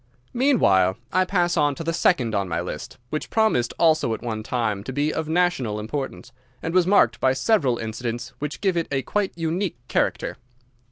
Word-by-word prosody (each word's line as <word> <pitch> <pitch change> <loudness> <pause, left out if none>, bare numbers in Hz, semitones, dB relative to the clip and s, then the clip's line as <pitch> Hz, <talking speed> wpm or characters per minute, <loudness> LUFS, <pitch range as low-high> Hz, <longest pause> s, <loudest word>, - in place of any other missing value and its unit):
Meanwhile 100 - +3 0.2
I 185 0 +3
pass 175 -2 +1
on 145 -3 +2
to 165 - -6
the 165 +1 -1
second 130 -9 +2
on 100 -2 0
my 80 - -1
list, - - -6
which 155 - -3
promised 220 - +2
also 155 -8 +3
at - - -11
one 110 -2 -3
time 110 -3 -2
to 130 - -4
be 145 +3 0
of 160 -1 -3
national 160 -11 +1
importance, 130 +4 -5 0.3
and 165 - -4
was 180 -1 +4
marked 120 - +4
by 130 0 +3
several 130 - +2
incidents 115 +2 -4
which 150 0 -5
give 190 -3 +1
it 170 -1 0
a 135 -2 0
quite 205 +7 -1
unique 170 +3 -2
character. - - -1
145 Hz, 185 wpm, -24 LUFS, 115-175 Hz, 0.3 s, was